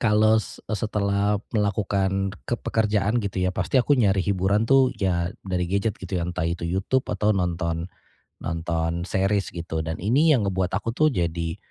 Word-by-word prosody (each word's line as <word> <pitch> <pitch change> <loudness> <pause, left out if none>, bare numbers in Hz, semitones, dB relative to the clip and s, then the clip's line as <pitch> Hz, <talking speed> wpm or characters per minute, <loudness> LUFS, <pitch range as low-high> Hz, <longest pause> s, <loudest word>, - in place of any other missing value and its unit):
kalau 110 0 +4
se - - -11
setelah 105 -1 0 0.2
melakukan 100 -2 0 0.2
ke 120 - +1
pekerjaan 110 +1 +1
gitu 100 -2 -4
ya 90 - +1
pasti 135 - -1
aku 130 +3 +4
nyari 95 -3 +2
hiburan 100 +2 +1
tuh, 135 +1 +5
ya 85 -3 0 0.2
dari 90 -2 -1
gadget 100 +3 0
gitu 95 0 -4
ya, 85 - -1
entah 85 -1 -2
itu 85 0 -3
YouTube 95 +10 0
atau 105 -1 +1
nonton, 85 -2 -1 0.6
nonton 85 +1 -2
series 95 +1 +1
gitu, 85 -1 -3
dan 80 0 -3
ini 140 - +3
yang 110 - 0
ngebuat 95 -2 0
aku 115 +2 -2
tuh 155 +5 +3
jadi 85 - -2
95 Hz, 170 wpm, -24 LUFS, 85-105 Hz, 0.6 s, tuh